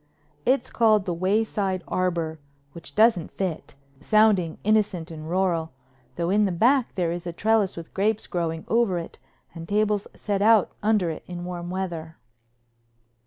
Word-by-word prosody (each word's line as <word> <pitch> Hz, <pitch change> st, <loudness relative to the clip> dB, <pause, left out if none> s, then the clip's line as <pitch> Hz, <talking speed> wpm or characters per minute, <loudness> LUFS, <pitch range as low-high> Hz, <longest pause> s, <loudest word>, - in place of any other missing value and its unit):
It's 265 Hz, +2 st, +2 dB
called 215 Hz, -4 st, +3 dB
the 180 Hz, -, -1 dB
Wayside 190 Hz, 0 st, 0 dB
Arbor, 170 Hz, -3 st, -1 dB, 0.3 s
which 170 Hz, +2 st, -10 dB
doesn't 215 Hz, -6 st, +4 dB
fit, 185 Hz, -8 st, -4 dB, 0.2 s
sounding 200 Hz, -2 st, +3 dB
innocent 200 Hz, -5 st, +1 dB
and 155 Hz, 0 st, -8 dB
rural, 170 Hz, -4 st, 0 dB, 0.4 s
though 170 Hz, +1 st, -1 dB
in 210 Hz, +1 st, +4 dB
the 195 Hz, -, 0 dB
back 240 Hz, +8 st, +2 dB
there 175 Hz, -3 st, 0 dB
is 175 Hz, 0 st, -5 dB
a -, -, -2 dB
trellis 210 Hz, +1 st, +1 dB
with 165 Hz, -1 st, -9 dB
grapes 210 Hz, +2 st, 0 dB
growing 165 Hz, -2 st, -3 dB
over 225 Hz, -5 st, +2 dB
it 170 Hz, -, -7 dB, 0.3 s
and 165 Hz, -1 st, -9 dB
tables 210 Hz, 0 st, +1 dB
set 200 Hz, -2 st, -2 dB
out 215 Hz, -1 st, +5 dB
under 210 Hz, -5 st, +2 dB
it 155 Hz, -, -8 dB
in 175 Hz, -1 st, -6 dB
warm 175 Hz, -1 st, -5 dB
weather. 170 Hz, -4 st, -5 dB
185 Hz, 155 wpm, -25 LUFS, 170-210 Hz, 0.4 s, out